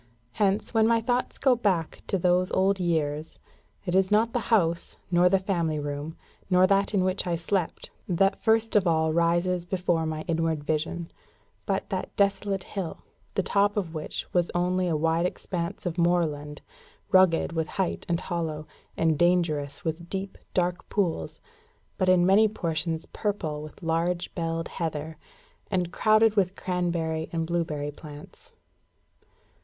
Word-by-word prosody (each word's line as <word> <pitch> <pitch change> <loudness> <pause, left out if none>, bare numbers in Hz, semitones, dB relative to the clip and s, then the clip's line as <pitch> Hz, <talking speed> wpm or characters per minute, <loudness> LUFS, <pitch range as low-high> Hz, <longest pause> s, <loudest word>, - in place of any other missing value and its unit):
Hence, 200 - 0
when 220 -1 +4
my 230 0 +4
thoughts 245 +2 -1
go 265 -2 +4
back 190 -9 -1
to 195 - +1
those 180 +1 +2
old 190 +1 +2
years, 160 -3 -1 0.5
it 175 - -2
is 190 0 +3
not 220 +2 +3
the 245 - +1
house, 170 -7 +1
nor 175 +1 +5
the 195 - +4
family 170 -5 -1
room, 145 +2 -4 0.3
nor 180 0 +5
that 195 +2 +2
in 190 - +3
which 185 0 0
I 175 - +1
slept, 175 +1 -2 0.2
that 195 +3 +2
first 225 0 +2
of 195 -3 +4
all 160 -1 +2
rises 170 +2 +2
before 175 -3 0
my 155 0 -3
inward 165 -3 -1
vision, 160 +3 -2 0.6
but - - -1
that - - -3
desolate 200 -1 +1
hill, 190 -5 -5 0.3
the 195 - +1
top 205 +2 +2
of 175 -5 -2
which 155 -2 -4
was 175 -1 +2
only 180 +1 +1
a 165 -3 +1
wide 165 +3 +2
expanse 170 -2 -5
of 175 0 -2
moorland, 155 -4 0 0.5
rugged 185 -4 +4
with 160 -1 -1
height 190 +1 -2
and 170 0 0
hollow, 160 -4 -3 0.3
and 160 -2 +2
dangerous 165 -5 +1
with 165 +1 -3
deep, 195 +1 -4 0.2
dark 180 0 0
pools, 185 -6 -1 0.6
but 185 -1 +2
in 180 -1 +5
many 200 +4 +6
portions 165 -5 -2
purple 180 -8 -2
with 155 +4 -11
large 170 +2 -1
belled 165 -1 -2
heather, 160 -2 -4 0.5
and 180 -3 -1
crowded 215 0 +4
with 190 -2 +2
cranberry 170 -3 -2
and 165 -1 -1
blaeberry 160 -4 -2
plants. 145 0 -12
175 Hz, 155 wpm, -27 LUFS, 160-190 Hz, 0.6 s, many